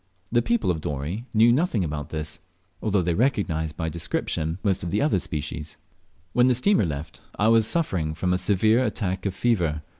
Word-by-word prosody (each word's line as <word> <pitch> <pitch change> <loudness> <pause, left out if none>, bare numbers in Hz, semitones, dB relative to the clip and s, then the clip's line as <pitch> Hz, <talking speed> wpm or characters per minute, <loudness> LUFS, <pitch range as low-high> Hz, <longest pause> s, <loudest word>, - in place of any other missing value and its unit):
The 120 0 +3
people 115 -4 +1
of 80 -3 -3
Dorey 75 - -4
knew 115 +2 +5
nothing 130 - +1
about 75 -1 -4
this, 80 0 -5 0.4
although 100 -4 +1
they 85 0 0
recognised 80 - 0
by 80 - -2
description 80 0 -2
most 95 -4 +1
of 85 - -3
the 100 - 0
otter 145 -10 +2
species. 75 -1 -5 0.6
When 125 +1 +4
the 125 - +4
steamer 190 - +3
left, 75 0 -6 0.2
I 105 +2 +3
was 115 -1 +4
suffering 90 - 0
from 90 +2 0
a 90 - +1
severe 110 +6 +3
attack 100 -5 -2
of 95 - -3
fever. 85 -11 0
95 Hz, 185 wpm, -25 LUFS, 80-115 Hz, 0.6 s, knew